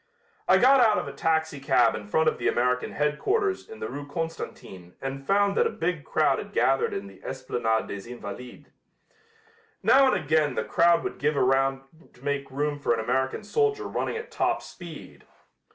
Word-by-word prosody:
I 190 - +6
got 265 +6 +6
out 220 -4 +5
of - - -2
a - - -6
taxicab 145 -6 +2
in 105 - -6
front 160 +9 +2
of - - +1
the - - 0
American 125 +1 0
headquarters 385 - 0
in 445 - -10
the - - -4
Rue 145 +1 -7
Constantine 145 - -6
and 135 0 -6
found 200 0 +3
that - - +3
a - - -2
big 165 -4 -3
crowd 145 -3 +2
had 205 0 -8
gathered 135 0 +2
in 100 - -4
the 95 -1 -14
Esplanade 120 -4 -1
des 100 +3 -7
Invalides. 125 +1 -9 1.2
Now 270 -1 +6
and - - +1
again 150 -2 +1
the - - 0
crowd 170 0 +3
would - - -5
give 150 +1 +1
ground 135 0 +2 0.3
to 125 - -21
make 140 -1 -2
room 145 +2 -2
for 120 -4 +1
an - - -4
American 130 - -1
soldier 420 - 0
running 455 - -3
at 460 +2 -8
top - - 0
speed. 170 -4 -11
145 Hz, 185 wpm, -26 LUFS, 130-180 Hz, 1.2 s, I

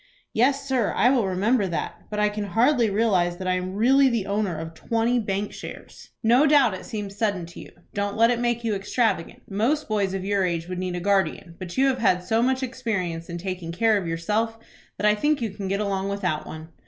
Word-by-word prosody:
"Yes, 275 +4 +2
sir; 255 -5 +1
I 245 - +4
will 240 -7 +2
remember 200 +4 +1
that. 165 -4 -4
But 210 - -3
I 210 0 +3
can 210 0 -4
hardly 235 +4 +3
realize 195 -5 +1
that 185 0 -5
I 185 - +2
am 185 +1 -3
really 265 +5 +5
the 230 -5 -1
owner 200 -4 -1
of 160 +1 -6
twenty 230 +7 0
bank 205 -1 -2
shares." - - -10
"No 245 +7 +5
doubt 280 -7 +5
it 185 - -7
seems 205 -4 -5
sudden 205 -5 -1
to 170 - -12
you. - - -10 0.2
Don't 200 0 -2
let 230 +2 +5
it 240 - 0
make 240 -1 0
you 225 -2 0
extravagant. 200 -2 -1
Most 235 +10 0
boys 200 -3 0
of 190 -1 -4
your 200 -1 +1
age 170 -2 -1
would 180 0 -4
need 185 -1 -3
a - - -2
guardian, 190 -2 0
but 185 +1 -7
you 270 - +4
have 265 -2 +1
had 180 -6 +2
so 225 +5 +1
much 260 +2 +1
experience 200 -10 -3
in 170 - -4
taking 180 -2 -5
care 220 +5 +2
of 195 -4 -1
yourself, 210 +8 -1 0.4
that - - -2
I 210 - +6
think 295 +8 +1
you 225 -4 -2
can 195 0 -6
get 195 +1 -1
along 195 -2 -1
without 180 -6 -2
one." 160 +1 -8
205 Hz, 230 wpm, -24 LUFS, 185-230 Hz, 0.4 s, I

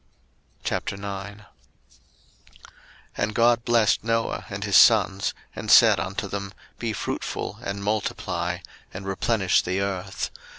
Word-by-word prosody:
01:009:001 100 +1 -4 1.7
And 105 0 -2
God 120 0 +4
blessed 115 -4 +3
Noah 115 0 -1
and 100 0 -5
his 100 -2 0
sons, 100 -2 +5 0.2
and - - -6
said - - +7
unto 95 +3 -3
them, 100 0 -5 0.2
Be 115 -2 -2
fruitful, 105 - -4
and 100 0 -5
multiply, 90 -4 -2 0.4
and 95 +1 -6
replenish 95 0 +1
the 95 +2 -2
earth. 95 -1 -3
100 Hz, 115 wpm, -25 LUFS, 95-110 Hz, 1.7 s, said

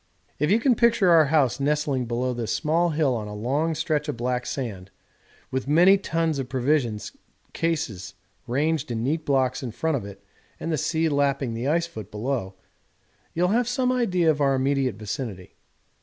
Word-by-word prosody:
'If 150 - +1
you 210 +4 +4
can 255 +1 +3
picture 235 -6 +3
our 160 -2 +7
house 140 -4 +2
nestling 145 -2 0
below 125 +2 -1
this 120 -2 -3
small 165 +3 +1
hill 150 -4 +1
on 110 -2 -4
a 105 - -7
long 140 +9 -1
stretch 155 -1 -1
of 145 - -3
black 125 +1 -2
sand, 100 -8 -5 0.6
with 130 0 -2
many 175 +6 +6
tons 165 -5 -1
of 130 -2 -4
provision 130 -4 +1 0.5
cases 115 - -2 0.3
ranged 145 +3 0
in 115 -1 -2
neat 155 +5 -1
blocks 130 -2 +1
in 130 - -4
front 160 +7 -1
of 120 - -6
it 100 -1 -11 0.4
and 165 - -3
the - - +2
sea 160 +3 0
lapping 140 -4 0
the 115 +4 -3
icefoot 155 - -2
below, 105 -3 -3 0.8
you 170 - +1
will 180 - +3
have 235 +3 +2
some 250 +1 +1
idea 185 -10 +2
of 145 -1 -3
our 135 -1 +3
immediate 135 -2 0
vicinity. 105 -3 -6
140 Hz, 180 wpm, -25 LUFS, 120-160 Hz, 0.8 s, our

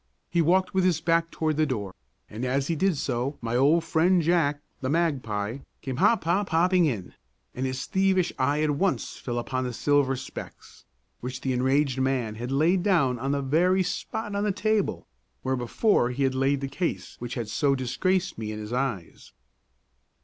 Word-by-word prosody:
He 170 0 +3
walked 185 +3 +2
with 190 -1 +2
his 180 -4 +2
back 165 0 +1
toward 155 -2 -1
the 155 0 +2
door, 105 -8 -3 0.3
and 110 +4 -7
as 135 +3 0
he 165 - +1
did 185 0 +1
so 130 +2 -2
my 115 0 -3
old 150 +6 +4
friend 175 +3 +3
Jack, 160 -3 +2 0.2
the 130 - -3
magpie, 130 -8 -1 0.2
came 130 -3 -4
hop 230 - +3
hop 185 +5 +1
hopping 175 +2 +3
in, 105 -10 -4 0.4
and 130 +1 -2
his 130 +1 -3
thievish 190 -2 +1
eye 145 +3 +2
at 155 - +2
once 185 +7 -1
fell 120 -2 -4
upon 130 +2 -2
the 125 -1 -3
silver 140 +1 +2
specs, 130 - -10 0.3
which 125 +1 -6
the 130 - -1
enraged 130 +1 +1
man 130 -5 0
had 120 +4 -5
laid 165 +7 +3
down 140 - +2
on 135 +3 -1
the 140 -1 0
very 180 +7 +3
spot 210 +4 -4
on 200 - 0
the 210 - +1
table 215 +1 0 0.4
where 130 0 0
before 125 - +2
he 130 +3 -2
had 135 -1 +2
laid 135 +1 +1
the 135 - -2
case 165 +6 -3
which 120 0 -5
had 120 -4 -3
so 140 +6 +1
disgraced 175 +7 -1
me 110 -1 -4
in 105 - -5
his 105 +2 -6
eyes. 125 -9 -3
140 Hz, 190 wpm, -26 LUFS, 125-170 Hz, 0.4 s, old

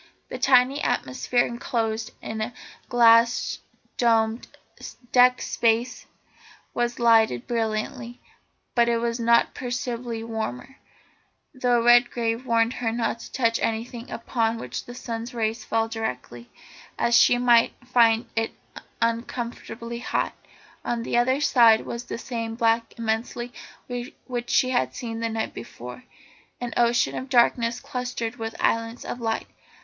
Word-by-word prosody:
The - - -6
tiny 260 +1 +4
atmosphere 240 - 0
enclosed 225 -2 -2
in 220 - -5
the 220 +3 -3 0.4
glass 235 -1 +4 0.4
domed 225 -1 +2 0.6
deck 250 0 +5
space 225 0 0 0.7
was 240 0 -1
lighted 225 - +4
brilliantly, 230 +1 -3 0.5
but 235 -1 +3
it 235 - +2
was 235 0 -2
not 235 0 +3
perceptibly 245 -2 -4
warmer, 225 - -5 0.8
though 245 -3 +1
Redgrave 240 0 +3
warned 230 0 +2
her 225 -2 0
not 230 0 -1
to - - -11
touch 230 -3 +1
anything 230 +2 -3
upon 230 -1 -1
which 125 - -6
the 245 - -9
sun's 235 0 -6
rays 225 0 -1
fell 225 +1 0
directly, 125 - -5 0.5
as 235 - +2
she 245 - +6
might 240 -1 +4
find 235 -2 +4
it 225 0 -1 0.5
uncomfortably 235 0 -3
hot. 245 - -1 0.5
On 235 -1 -2
the - - -2
other 260 +3 +3
side 235 -6 +5
was 235 +1 -5
the - - -5
same 230 -2 -4
black 230 0 +1
immensity 230 +2 -3 0.7
which 240 -2 -4
she 255 - +3
had 245 - 0
seen 230 -3 -5
the 230 0 -1
night 225 0 -3
before, 125 - -9 0.5
an 245 -1 -4
ocean 235 0 +2
of 260 - -5
darkness 235 -2 +3
clustered 245 -2 -4
with 225 -1 -5
islands 230 +1 0
of 245 - -5
light. 225 -1 -1
235 Hz, 135 wpm, -25 LUFS, 225-245 Hz, 0.8 s, she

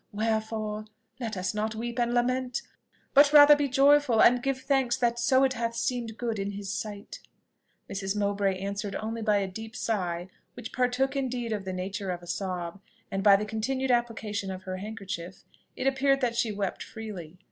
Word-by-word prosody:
Wherefore, 215 0 -2 0.3
let 225 -5 -4
us 185 +2 -1
not 215 +1 -2
weep 235 +2 -4
and 240 0 +1
lament, 250 +1 0 0.5
but 285 +1 +7
rather 295 0 +9
be 290 -1 0
joyful 275 -2 +4
and 245 +2 +6
give 270 0 -1
thanks 270 -3 +1
that 240 -1 +1
so 260 +2 +4
it 265 -1 +3
hath 230 -1 -2
seemed 230 -1 -2
good 230 -3 -2
in 200 +1 -3
his 200 0 -5
sight!" 205 -2 -6 0.7
Mrs. 195 0 -3
Mowbray 200 -2 0
answered 200 +1 -4
only 225 +1 -4
by 210 -2 +3
a 195 -1 0
deep 220 +4 -8
sigh, 180 -5 -2 0.3
which 225 - -8
partook 255 +2 +1
indeed 250 -4 -2
of 205 -2 -4
the 190 - -3
nature 190 +2 -4
of 175 -1 -4
a - - -12
sob; 180 0 -4 0.3
and 195 - -1
by 200 0 +7
the 205 +2 0
continued 255 +5 -1
application 225 -4 -1
of 190 0 -6
her 185 0 -4
handkerchief, 195 -3 -6 0.3
it - - -4
appeared 270 0 +3
that 240 -2 0
she 230 -2 +1
wept 200 -2 -3
freely. 195 -7 -8
220 Hz, 185 wpm, -28 LUFS, 200-245 Hz, 0.7 s, rather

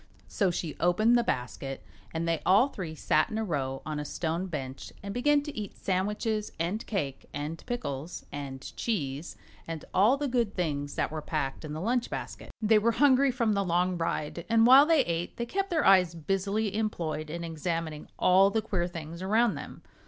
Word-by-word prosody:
So 195 - +1
she 170 -2 -3
opened 215 +7 +4
the 240 - +4
basket 135 - -3 0.3
and 165 +1 -2
they 165 -1 0
all 210 +9 +5
three 170 -10 -6
sat 155 0 +2
in 220 - -3
a 220 - 0
row 135 -8 -2
on 155 -1 -3
a - - -2
stone 165 +4 -2
bench 135 -5 -6
and 200 0 -5
began 290 +4 +3
to 295 -1 -7
eat 210 -2 -6
sandwiches 210 +3 -1
and 180 +7 -1
cake 145 - -3
and 150 +3 -4
pickles 175 - -4
and 135 -2 -7
cheese 150 - -3 0.3
and 165 -2 -5
all 215 +9 +5
the 290 0 -1
good 240 -5 0
things 145 -5 -2
that - - -1
were 155 0 -4
packed 145 -2 -3
in 150 -1 -5
the 155 - -4
lunch 240 +4 0
basket. - - -6
They 215 0 +5
were 230 +2 +2
hungry 275 +1 +5
from 235 -4 +1
the 200 -1 +1
long 180 0 +1
ride, 165 -1 -2
and 225 0 +5
while 270 +4 +8
they 325 -3 +5
ate 170 +1 -3
they 235 - -2
kept 390 +9 -2
their 325 -3 +1
eyes 180 -3 +5
busily 195 +5 -1
employed 165 -8 -2
in 170 +2 -4
examining 165 -1 -3
all 190 +2 +5
the 220 +1 0
queer 185 -5 -1
things 170 -1 -7
around 220 +4 +3
them. - - -9
180 Hz, 195 wpm, -29 LUFS, 155-220 Hz, 0.3 s, while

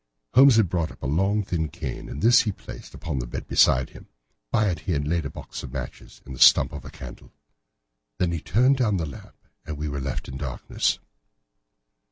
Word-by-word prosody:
Holmes 130 0 +7
had 110 -4 +4
brought 85 -1 -1
up - - -16
a - - -2
long 95 +9 +1
thin 80 -4 -2
cane, 75 -5 -6
and 70 - -6
this 120 +2 +7
he 105 - -1
placed - - -11
upon 75 -5 -4
the - - -4
bed 65 +2 -6
beside 65 +1 +3
him. - - -14 0.4
By 110 -1 +2
it 85 - -4
he 80 -1 -1
laid 75 +2 -1
the - - -3
box - - -8
of 65 - -8
matches 65 -2 -8
and 70 - -9
the 65 - -9
stump - - +6
of 75 - -7
a - - -9
candle. - - -11 0.9
Then 90 -2 +1
he 85 -2 -3
turned 125 - +3
down 110 -6 +1
the 85 - -2
lamp, 70 - -11 0.3
and 75 -1 -6
we 75 +1 -3
were 70 -1 -4
left 65 0 -4
in 65 - -6
darkness. 65 -4 -1
80 Hz, 215 wpm, -25 LUFS, 70-100 Hz, 0.9 s, Holmes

